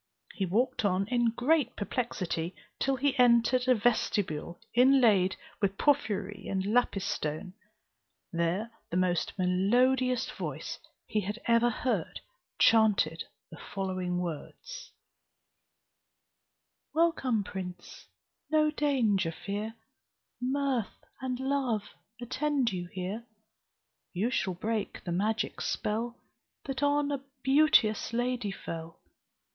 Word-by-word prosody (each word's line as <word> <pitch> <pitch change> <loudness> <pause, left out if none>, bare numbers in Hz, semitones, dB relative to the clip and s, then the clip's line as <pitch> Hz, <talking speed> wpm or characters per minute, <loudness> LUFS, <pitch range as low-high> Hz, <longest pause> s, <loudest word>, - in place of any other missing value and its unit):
He 195 -4 -2
walked 225 +7 +1
on, 195 -1 +1
in 240 -2 +3
great 255 +3 +1
perplexity, 190 -6 -2 0.2
till 270 0 +1
he 275 +1 +1
entered 245 +1 +4
a 255 - +6
vestibule 200 -7 0
inlaid 235 -7 +5 0.3
with 195 -1 +1
porphyry 205 -8 0
and 190 -1 -1
lapis 210 -3 +1
stone. 155 +1 -3 0.8
There 170 +7 0 0.2
the 175 - -1
most 180 -2 +1
melodious 245 +8 +2
voice - - -5 0.3
he 215 - 0
had 205 +3 -4
ever 235 +1 +4
heard 245 +2 -2 0.4
chanted 205 -8 +4 0.3
the 165 - -10
following 185 -2 -3
words: 180 - -6 2.0
"Welcome, 270 -10 +2
prince, 180 -2 -8 0.4
no 305 -1 +3
danger 235 - +1
fear, 205 +6 -5 0.7
Mirth 265 -3 -1 0.2
and 255 -1 -2
love 265 -5 0 0.4
attend 265 0 0
you 175 -2 -4
here; 190 +6 -5 0.9
You 205 +7 0
shall 190 -7 0
break 215 +3 -3
the 175 - -4
magic 210 +5 -1
spell, 230 +3 -2 0.5
That 270 -1 -3
on 290 0 +2
a 275 -1 -3 0.2
beauteous 265 -6 +4
lady 245 -2 0
fell. 165 -3 -7
220 Hz, 110 wpm, -30 LUFS, 190-255 Hz, 2.0 s, a